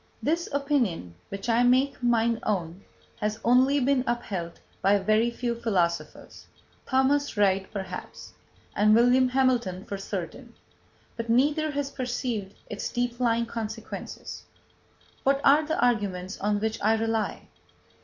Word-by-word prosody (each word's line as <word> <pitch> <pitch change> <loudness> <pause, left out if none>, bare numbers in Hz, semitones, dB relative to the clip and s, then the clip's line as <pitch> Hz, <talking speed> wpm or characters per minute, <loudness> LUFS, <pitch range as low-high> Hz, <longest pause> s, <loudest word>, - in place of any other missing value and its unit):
This 335 +3 0
opinion, 270 - 0 0.2
which 195 +3 -6
I 235 0 +3
make 255 +3 +3
mine 235 -1 +2
own, 185 -2 -2 0.3
has 215 0 -2
only 260 +4 +4
been 265 0 +2
upheld 195 -8 -3 0.2
by 200 +1 +4
very 215 +4 +2
few 235 0 -2
philosophers 175 -9 -2 0.4
Thomas 270 0 +1
Reid 195 -2 +2
perhaps, 190 -3 -7 0.4
and 215 +1 +5
William 245 +2 +5
Hamilton 245 -8 +1
for 200 - -5
certain; 200 +6 -6 0.6
but 230 0 -5
neither 295 +6 +2
has 285 -1 -3
perceived 245 -6 -3
its 210 - -4
deep 245 0 -2
lying 235 -1 +2
consequences. 225 -2 -7 0.8
What 275 +1 +2
are 290 +3 +6
the 315 +1 -2
arguments 200 -6 0
on 205 +1 +1
which 220 +1 -2
I 220 +2 +3
rely? 225 -1 -2
230 Hz, 130 wpm, -27 LUFS, 200-255 Hz, 0.8 s, are